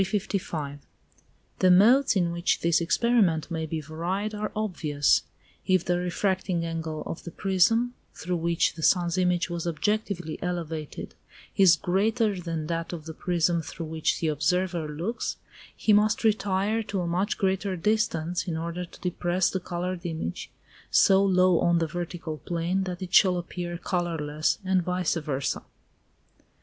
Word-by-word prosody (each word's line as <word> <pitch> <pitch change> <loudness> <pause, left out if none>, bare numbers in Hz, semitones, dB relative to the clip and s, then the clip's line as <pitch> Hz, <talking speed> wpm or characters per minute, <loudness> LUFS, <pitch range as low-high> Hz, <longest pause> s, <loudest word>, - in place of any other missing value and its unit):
The 185 - +5
modes 230 +8 +6
in 175 -3 +2
which 170 +1 0
this 170 0 +3
experiment 175 -4 +2
may 160 -1 -2
be 155 0 -3
varied 175 +8 -3
are 210 0 -3
obvious. 155 -9 +1 0.5
If 185 -2 +3
the 175 0 +1
refracting 180 -1 -1
angle 160 -2 -4
of - - -6
the - - -6
prism, 200 +7 +2 0.2
through 180 +1 -2
which 170 0 +1
the 160 - -9
sun's 175 +1 +2
image 180 -1 +1
was 170 0 -3
objectively 180 -2 -2
elevated, 165 -4 -4 0.4
is 185 -4 +7
greater 205 +4 +1
than 165 -3 -4
that 165 +1 -3
of 160 -3 -7
the 160 - -6
prism 170 0 0
through 165 +2 -7
which 160 0 -1
the 160 - 0
observer 165 +3 0
looks, 170 +10 -3 0.4
he 215 - +3
must 210 +2 +3
retire 210 0 +1
to 200 -3 -3
a - - -2
much 185 +5 0
greater 190 0 0
distance, 175 -3 0
in 165 -2 -2
order 170 +2 -4
to - - -17
depress 180 0 0
the 190 - -1
coloured 180 0 -4
image 160 - -4 0.4
so 195 0 +5
low 185 -2 +4
on 170 0 +3
the 165 - +1
vertical 170 -1 -5
plane 175 +3 -1
that 180 0 -5
it 185 0 -8
shall 185 -4 +6
appear 175 0 -5
colourless, 165 -4 -1
and 185 -1 +2
vice 180 0 0
versâ. 145 -4 -2
175 Hz, 150 wpm, -26 LUFS, 165-190 Hz, 0.5 s, is